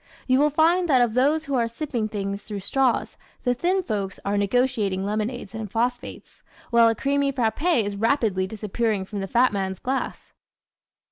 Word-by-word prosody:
You 255 0 +3
will 300 +1 +4
find 335 +4 +3
that 255 -4 +5
of 230 -2 0
those 290 +6 +2
who 280 - -4
are 235 -3 +2
sipping 235 -2 -3
things 200 -1 -4
through 205 -1 -6
straws 255 +5 0 0.3
the 245 - +2
thin 365 +9 0
folks 200 - -3
are 200 +1 0
negotiating 205 -2 +1
lemonades 215 +1 -3
and 220 -2 -5
phosphates, 245 +2 -3 0.3
while 235 -1 +6
a 225 - 0
creamy 280 +3 +1
frappé 260 +3 +1
is 205 0 -4
rapidly 215 -4 +1
disappearing 210 0 -2
from 205 +1 -6
the 195 - -3
fat 240 +4 +3
man's 190 -1 -2
glass. 265 +6 -4
230 Hz, 175 wpm, -24 LUFS, 205-270 Hz, 0.3 s, while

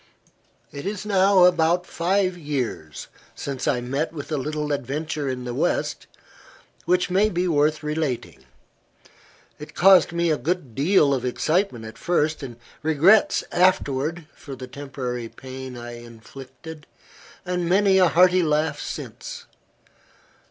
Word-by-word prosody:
IT 140 - -7
is 205 0 -4
now 195 -2 +5
about 175 0 +3
five 185 +2 0
years 130 - -4 0.3
since 140 0 -5
I 130 -5 +1
met 140 +6 -2
with 155 -1 -8
a 155 - 0
little 150 +2 -3
adventure 145 +2 -3
in 125 -1 -4
the 120 - -4
West, - - -1 0.8
which 180 0 +1
may 200 +4 +3
be 180 -2 -1
worth 155 -1 +1
relating. 150 -4 -3 1.2
It 150 - -11
caused 190 -3 +6
me 170 -1 +1
a 155 - +1
good 165 -7 -2
deal 145 - +3
of 130 -2 -2
excitement 130 - -1
at 110 - -10
first; 155 -3 0 0.4
regrets 160 +8 +4
afterward, 165 -3 +1
for 140 -2 -10
the 130 - -8
temporary 125 -3 -6
pain 130 0 -9
I 120 0 -8
inflicted, 135 +7 -12 0.6
and 180 -1 -2
many 195 +1 +4
a 180 - +6
hearty 180 +2 +4
laugh 150 -2 0
since. - - -7
155 Hz, 130 wpm, -23 LUFS, 135-180 Hz, 1.2 s, caused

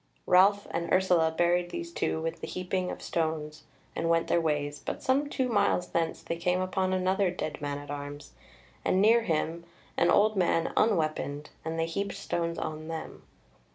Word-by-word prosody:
Ralph 200 +3 +5
and 170 0 -2
Ursula 180 -3 +4
buried 175 +2 +1
these 340 - -5
two 160 - -1
with 165 0 -3
the - - -4
heaping 185 0 -2
of - - -6
stones 155 -2 -2 0.3
and 165 - -1
went 165 0 +2
their 170 - +3
ways; 145 -2 -1
but - - -5
some 275 +2 +2
two 260 -3 0
miles 200 -5 +1
thence 165 -1 -1
they 170 - -3
came 180 +1 +1
upon 185 0 0
another 185 +1 +2
dead 175 -4 -4
man 145 -1 -2
at 145 0 -8
arms, 145 0 -7 0.5
and 185 - +2
near 225 +4 +5
him 165 -3 -1 0.3
an 170 - +4
old 215 +1 +4
man 170 -3 +1
unweaponed, 155 -7 0
and 160 0 -3
they 165 - +1
heaped 200 +5 -3
stones 170 -1 -2
on 155 0 -4
them. 165 -1 -6
170 Hz, 180 wpm, -29 LUFS, 160-190 Hz, 0.5 s, Ralph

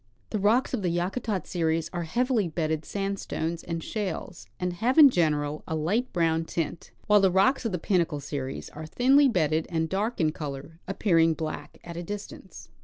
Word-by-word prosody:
The 215 - -1
rocks 220 +8 +2
of 245 - 0
the 180 - 0
Yakutat 185 +4 -2
series 165 -2 0
are 175 -1 -2
heavily 240 +2 +1
bedded 160 -1 -2
sandstones 195 -4 -3
and 165 -1 -4
shales, 190 - -4
and 180 0 -1
have 240 - 0
in 290 -4 +10
general 150 -5 0
a 160 - -2
light 205 +12 0
brown 165 -2 +1
tint; 165 0 -4 0.2
while 210 -1 +5
the 190 - +5
rocks 195 +8 +3
of 225 - 0
the 180 - -1
Pinnacle 170 -4 0
series 140 -1 -5
are 155 +1 -8
thinly 270 - +4
bedded 160 -6 +1
and 160 -2 -1
dark 210 +5 -1
in 155 -3 +3
color, 150 +1 -7
appearing 165 -5 +3
black 155 0 -5
at 170 -1 -8
a - - -3
distance. 205 +3 -8
175 Hz, 180 wpm, -27 LUFS, 160-205 Hz, 0.2 s, in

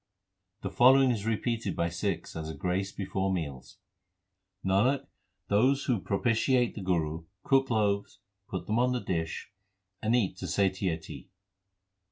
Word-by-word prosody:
3 - - -1
The - - -20
following 130 +3 +6
is 110 -2 -2
repeated 115 -2 -1
by 85 0 0
Sikhs 85 +1 -3
as 80 -1 -4
a 80 - -5
grace 95 +2 -1
before 95 -1 -2
meals: 70 -8 -4 0.9
Nanak, 125 +9 +2 0.4
they 115 +7 +4
who 120 -6 +1
propitiate 120 +4 +1
the 105 - -7
Guru 80 -3 -1 0.2
Cook 135 -1 +3
loaves, 100 -3 0 0.3
put 95 - -4
them 110 +2 0
on 125 +1 +3
the 125 - 0
dish, 80 +1 -3 0.5
and 110 +2 +2
eat 100 -6 +1
to - - -5
satiety. 95 -4 -1
100 Hz, 145 wpm, -29 LUFS, 90-120 Hz, 0.9 s, following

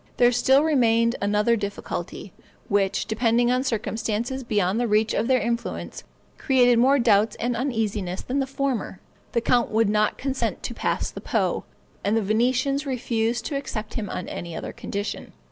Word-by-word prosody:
There 245 0 +5
still 265 +4 +4
remained 235 -6 +3
another 210 +3 +2
difficulty, 200 -3 -5 0.4
which, 200 -1 +1
depending 235 +2 +2
on 255 +1 +1
circumstances 230 +1 -2
beyond 210 -3 0
the 240 - +1
reach 215 +1 +2
of 225 - 0
their 255 -1 +4
influence, 235 +2 -3 0.4
created 245 -3 +4
more 270 +4 +5
doubts 220 -3 +3
and 240 +1 -2
uneasiness 215 -7 -2
than 265 +3 -1
the 270 - 0
former; 270 -8 -2 0.3
the 235 - +2
count 240 0 +2
would 220 -1 +2
not 210 0 +1
consent 270 0 -2
to - - -4
pass - - -1
the - - -8
Po, - - -1 0.4
and 210 +3 +2
the 225 - +1
Venetians 255 +7 +1
refused 235 -2 -1
to 290 - -3
accept 225 -6 -4
him 210 -5 -4
on 180 - -5
any 170 -1 -6
other - - -6
condition. 200 +1 -5
230 Hz, 165 wpm, -24 LUFS, 210-255 Hz, 0.4 s, There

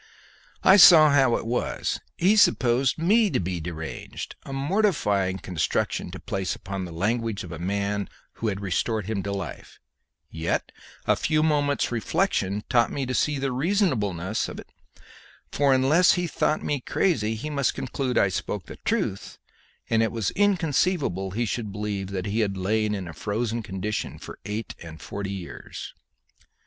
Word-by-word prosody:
I 190 - +8
saw 160 -5 +9
how 135 -4 +4
it - - -3
was 120 +2 -1 0.2
he 190 +5 +4
supposed 130 - +3
me 205 +7 +4
deranged, 85 - -4
a - - -10
mortifying 135 - +1
construction 90 -5 -1
to - - -8
place 95 -1 -3
upon 95 -1 -5
the 85 - -8
language 110 +5 -1
of 90 - -9
a 85 - -6
man 100 +2 -1 0.3
who 115 - -2
had 100 -1 -2
restored 105 +2 -1
him 105 -1 -2
to 100 +2 -4
life; 95 -6 -6 0.5
yet 80 +1 -2 0.3
a - - +4
few 155 0 +1
moments' 145 -4 +1
reflection 110 - 0
taught 120 -3 +3
me 140 - -2
to 130 - -3
see 150 +2 +1
the 135 -1 -1
reasonableness 125 - 0
of - - -8
it, - - -12 0.8
for 140 -1 +2
unless 135 +7 +5
he 180 -1 0
thought 155 -2 0
me 145 -3 -1
crazy 110 - 0
he 150 +8 -5
must 140 -3 0
conclude 130 0 -2
I 100 - +4
spoke 95 0 -3
the - - -10
truth, 95 - -2 0.5
and 115 0 +2
it 115 - +1
was 110 -5 -1
inconceivable 165 - +1
he 115 +6 -1
should 110 -1 -3
believe 100 -1 -3
that 95 -1 -4
he 105 +2 -1
had 100 -3 0
lain 105 +3 0
in 95 -3 -5
a 80 - -7
frozen 110 +6 -2
condition 105 +1 -4
for - - -10
eight 105 +2 -4
and 80 -1 -9
forty 100 +3 -5
years. 95 -3 -7
110 Hz, 160 wpm, -25 LUFS, 95-140 Hz, 0.8 s, saw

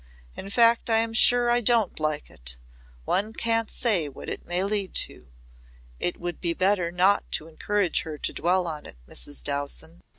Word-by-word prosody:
In 195 - -7
fact 230 +2 +4
I'm 225 0 +2
sure 240 +1 +5
I 240 0 +3
don't 230 -5 +2
like 155 -1 -2
it. 60 +1 -6 0.5
One 210 +4 0
can't 230 -1 0
say 190 - +1
what 135 - -9
it - - -6
may 175 +2 0
lead 200 -1 -1
to. - - -1 0.7
It 175 - -2
would 175 -1 -5
be 170 -2 0
better 185 -2 +2
not 185 +3 +2
to 155 - -1
encourage 195 +3 0
her 155 -2 -6
to - - -3
dwell 180 +2 +1
on 155 -2 -5
it, - - -12
Mrs. 145 - -4
Dowson." 145 +4 -4
185 Hz, 175 wpm, -26 LUFS, 160-225 Hz, 0.7 s, sure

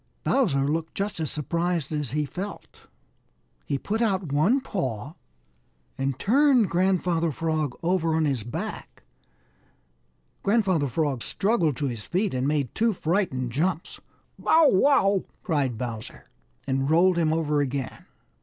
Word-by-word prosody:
Bowser 145 - +2
looked 160 +2 -2
just 200 -2 -3
as 155 -3 -2
surprised 170 +1 -2
as 150 -4 -2
he 150 +3 -1
felt. 190 +9 -8 0.8
He 140 - 0
put 215 - -2
out 190 -8 0
one 160 - +3
paw 140 - -4 0.8
and 135 -1 -2
turned 255 - +3
Grandfather 175 -2 +1
Frog 155 -3 -2
over 165 -2 +1
on 160 -1 +2
his 135 -5 0
back. 120 +3 -6 1.4
Grandfather 195 -8 +2
Frog 135 -1 -1
struggled 195 - 0
to 145 - -2
his 120 -5 -3
feet 190 - -1
and 130 +1 0
made 145 -4 0
two 225 0 +2
frightened 160 - -1
jumps. 165 +5 -2 0.4
"Bow, 320 -2 +5
wow!" 195 -3 +3 0.2
cried 145 - 0
Bowser 115 -2 -7 0.3
and 135 0 0
rolled 175 +2 +4
him 160 -2 +2
over 150 -2 +1
again. 135 -2 -4
160 Hz, 135 wpm, -25 LUFS, 140-190 Hz, 1.4 s, Bow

